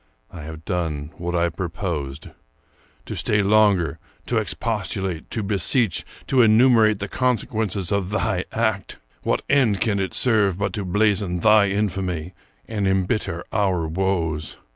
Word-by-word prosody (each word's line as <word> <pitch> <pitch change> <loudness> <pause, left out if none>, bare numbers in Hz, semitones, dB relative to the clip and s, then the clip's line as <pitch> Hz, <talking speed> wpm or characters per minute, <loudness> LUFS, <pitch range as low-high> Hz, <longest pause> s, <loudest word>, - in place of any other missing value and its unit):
I 85 - -9
have 80 0 -9
donq 80 -4 -2
what 85 0 -3
I 85 0 +2
purposed. 80 -5 -4 0.8
To - - -5
stay 105 -1 +1
longer, 100 -6 +3 0.3
to - - -1
expostulate, 95 -4 -3
to 110 - -3
be 100 0 -1
seech, 105 0 +1 0.2
to 130 -2 +3
enumerate 110 -1 +5
the 100 - -4
consequences 110 -7 -1
of 100 -2 0
thy 100 -3 -1
act, 110 -4 -1
— - - -37
what - - 0
end 120 -9 +3
can 105 -2 0
it 95 - -3
serve 105 -7 +2
but 100 -1 -2
to 100 -1 -3
blazon 100 -2 +1
thy 105 -1 +5
infamy 95 -4 -2 0.3
and 105 -3 -1
embitter 95 -2 0
our 95 -6 +1
woes? 80 -3 -1
95 Hz, 145 wpm, -22 LUFS, 85-110 Hz, 0.8 s, enumerate